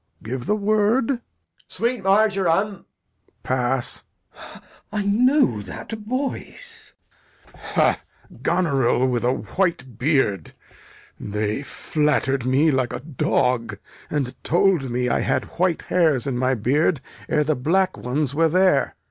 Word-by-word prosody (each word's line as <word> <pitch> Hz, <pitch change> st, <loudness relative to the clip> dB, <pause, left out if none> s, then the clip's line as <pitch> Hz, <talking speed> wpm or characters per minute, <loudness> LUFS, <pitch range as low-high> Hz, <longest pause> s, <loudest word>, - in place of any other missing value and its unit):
Give 120 Hz, +2 st, -5 dB
the 210 Hz, -, +2 dB
word. 215 Hz, +4 st, +2 dB
Edg. 245 Hz, -3 st, -3 dB, 0.5 s
Sweet 235 Hz, -1 st, -2 dB
marjoram. 195 Hz, -1 st, +3 dB
Lear. 195 Hz, -, -13 dB, 0.6 s
Pass. 130 Hz, 0 st, 0 dB, 0.3 s
Glou. -, -, -13 dB, 0.3 s
I 210 Hz, -1 st, -2 dB
know 220 Hz, -, +3 dB
that 100 Hz, -, -9 dB
voice. 275 Hz, -, -5 dB, 0.6 s
Lear. -, -, -23 dB
Ha! -, -, +2 dB, 0.4 s
Goneril 140 Hz, -8 st, +2 dB
with 120 Hz, -2 st, -1 dB
a 125 Hz, -, +3 dB
white 130 Hz, -, -2 dB
beard? 125 Hz, -, +1 dB, 0.7 s
They 105 Hz, +3 st, -2 dB
flatter'd 140 Hz, -3 st, -1 dB
me 140 Hz, +5 st, +3 dB
like 130 Hz, -3 st, 0 dB
a -, -, -4 dB
dog, 125 Hz, -4 st, 0 dB, 0.3 s
and 135 Hz, -4 st, -1 dB
told 175 Hz, -5 st, +2 dB
me 125 Hz, +1 st, -1 dB
I 120 Hz, -, +1 dB
had -, -, 0 dB
white 180 Hz, -2 st, +1 dB
hairs 160 Hz, -8 st, +2 dB
in 135 Hz, -3 st, -2 dB
my 130 Hz, +1 st, +1 dB
beard 140 Hz, -, +1 dB, 0.3 s
ere 150 Hz, -, +2 dB
the 155 Hz, +1 st, +1 dB
black 185 Hz, +8 st, +1 dB
ones 135 Hz, +2 st, -1 dB
were 165 Hz, +2 st, +3 dB
there. 185 Hz, +3 st, +2 dB
150 Hz, 130 wpm, -22 LUFS, 125-195 Hz, 0.7 s, marjoram